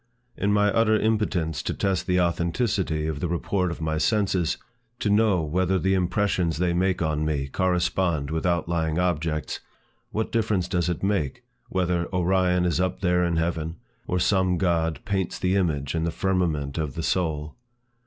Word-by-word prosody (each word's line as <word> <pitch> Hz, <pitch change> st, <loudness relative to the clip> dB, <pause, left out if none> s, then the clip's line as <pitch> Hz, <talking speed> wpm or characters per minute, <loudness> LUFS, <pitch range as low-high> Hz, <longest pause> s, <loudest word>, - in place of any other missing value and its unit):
In 100 Hz, +2 st, 0 dB
my 105 Hz, 0 st, +4 dB
utter 110 Hz, -1 st, +3 dB
impotence 95 Hz, -, 0 dB
to -, -, -3 dB
test 95 Hz, -2 st, -1 dB
the 90 Hz, -1 st, +2 dB
authenticity 85 Hz, -1 st, 0 dB
of 80 Hz, -2 st, -2 dB
the 90 Hz, -, -1 dB
report 90 Hz, +2 st, 0 dB
of 85 Hz, -, -5 dB
my 80 Hz, 0 st, -1 dB
senses, 95 Hz, -4 st, +1 dB, 0.4 s
to 105 Hz, -, 0 dB
know 105 Hz, -5 st, +3 dB
whether 90 Hz, +4 st, +1 dB
the 95 Hz, +1 st, +1 dB
impressions 90 Hz, -3 st, +1 dB
they 90 Hz, 0 st, +1 dB
make 90 Hz, 0 st, +1 dB
on 80 Hz, -1 st, 0 dB
me 75 Hz, -3 st, -1 dB
correspond 90 Hz, -2 st, 0 dB
with 80 Hz, 0 st, -1 dB
outlying 85 Hz, -2 st, 0 dB
objects, 80 Hz, -3 st, -1 dB, 0.5 s
what 110 Hz, +1 st, -2 dB
difference 105 Hz, -5 st, +1 dB
does 90 Hz, -1 st, 0 dB
it 85 Hz, 0 st, -3 dB
make, 95 Hz, -9 st, -1 dB, 0.3 s
whether 90 Hz, -2 st, 0 dB
Orion 90 Hz, 0 st, +2 dB
is 85 Hz, -1 st, +1 dB
up 90 Hz, 0 st, -1 dB
there 90 Hz, -2 st, +2 dB
in 85 Hz, -1 st, +1 dB
heaven, 80 Hz, -1 st, -1 dB, 0.3 s
or 90 Hz, -, 0 dB
some 95 Hz, 0 st, +2 dB
god 85 Hz, -3 st, +1 dB
paints 95 Hz, -4 st, -1 dB
the 90 Hz, +1 st, +1 dB
image 75 Hz, -8 st, 0 dB
in 80 Hz, -1 st, 0 dB
the 85 Hz, -, 0 dB
firmament 80 Hz, -5 st, -1 dB
of 75 Hz, -3 st, -3 dB
the 80 Hz, -, -3 dB
soul? 80 Hz, -5 st, -1 dB
90 Hz, 170 wpm, -25 LUFS, 80-95 Hz, 0.5 s, my